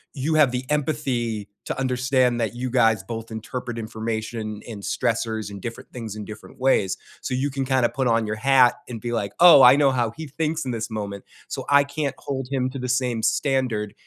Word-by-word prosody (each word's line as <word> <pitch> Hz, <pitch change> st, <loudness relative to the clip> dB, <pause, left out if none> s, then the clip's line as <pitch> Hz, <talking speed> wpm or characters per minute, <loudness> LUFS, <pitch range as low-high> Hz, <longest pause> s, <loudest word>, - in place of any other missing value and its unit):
you 155 Hz, +3 st, -1 dB
have 150 Hz, -5 st, +5 dB
the 125 Hz, 0 st, -2 dB
empathy 130 Hz, -8 st, -1 dB, 0.2 s
to -, -, -3 dB
understand 125 Hz, -1 st, +1 dB
that 115 Hz, +1 st, -2 dB
you 125 Hz, +1 st, -3 dB
guys 115 Hz, -5 st, +3 dB
both 115 Hz, +3 st, -6 dB
interpret 120 Hz, +2 st, -5 dB
information, 110 Hz, -1 st, -4 dB
and 105 Hz, -3 st, -7 dB
stressors, 110 Hz, -2 st, -1 dB
and 100 Hz, -2 st, -8 dB
different 115 Hz, 0 st, -7 dB
things, 115 Hz, -4 st, -6 dB
in 105 Hz, -1 st, -6 dB
different 110 Hz, +1 st, -11 dB
ways. 125 Hz, -8 st, +2 dB, 0.2 s
So, -, -, -4 dB
you 140 Hz, +2 st, -1 dB
can 135 Hz, 0 st, -2 dB
kind 130 Hz, -2 st, +2 dB
of -, -, -1 dB
put 135 Hz, -3 st, 0 dB
on 115 Hz, -1 st, +2 dB
your 110 Hz, -, -2 dB
hat 130 Hz, +1 st, +5 dB
and 115 Hz, -2 st, -5 dB
be 120 Hz, -1 st, -3 dB
like, 105 Hz, -4 st, -2 dB
"Oh, 170 Hz, -5 st, +9 dB
I 125 Hz, +2 st, +9 dB
know 140 Hz, -2 st, +4 dB
how 120 Hz, -4 st, 0 dB
he 160 Hz, -, -5 dB
thinks 155 Hz, +1 st, -2 dB
in 130 Hz, -, -2 dB
this 115 Hz, -1 st, -3 dB
moment. 100 Hz, -2 st, -5 dB, 0.2 s
So, -, -, -5 dB
I 140 Hz, 0 st, +6 dB
can't 140 Hz, -1 st, -3 dB
hold 135 Hz, -2 st, -4 dB
him 130 Hz, -2 st, 0 dB
to 135 Hz, -, -6 dB
the 125 Hz, -, -4 dB
same 125 Hz, -2 st, 0 dB
standard." 125 Hz, -7 st, 0 dB
125 Hz, 215 wpm, -23 LUFS, 110-135 Hz, 0.2 s, Oh